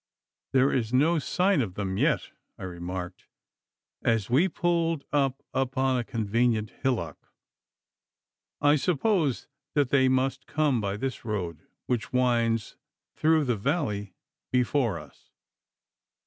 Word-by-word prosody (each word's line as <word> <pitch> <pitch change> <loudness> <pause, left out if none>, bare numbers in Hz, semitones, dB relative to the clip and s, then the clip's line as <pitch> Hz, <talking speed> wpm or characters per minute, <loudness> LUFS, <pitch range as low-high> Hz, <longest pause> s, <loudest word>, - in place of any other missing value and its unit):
'There 135 +1 +4
is 115 -3 0
no 155 +6 +3
sign 180 +2 +2
of 95 -7 -4
them 95 -2 -2
yet,' - - +1 0.3
I - - -9
remarked, 90 0 -6 0.7
as 115 -1 0
we 150 +9 +4
pulled 165 -2 0
up 135 -2 +1
upon 130 0 +1
a - - -1
convenient 115 -1 0
hillock. 115 - -2 1.3
'I 145 +1 +5
suppose 165 - +1 0.3
that 145 -4 +2
they 130 -1 +4
must 130 +1 0
come 145 -6 +1
by 100 0 -2
this 130 +3 -4
road 95 -8 -3 0.3
which 120 -3 -2
winds 115 -3 +1 0.4
through 160 0 +3
the 125 -4 +1
valley 105 - -2 0.4
before 125 - +1
us. 75 -2 -14
125 Hz, 120 wpm, -27 LUFS, 105-145 Hz, 1.3 s, I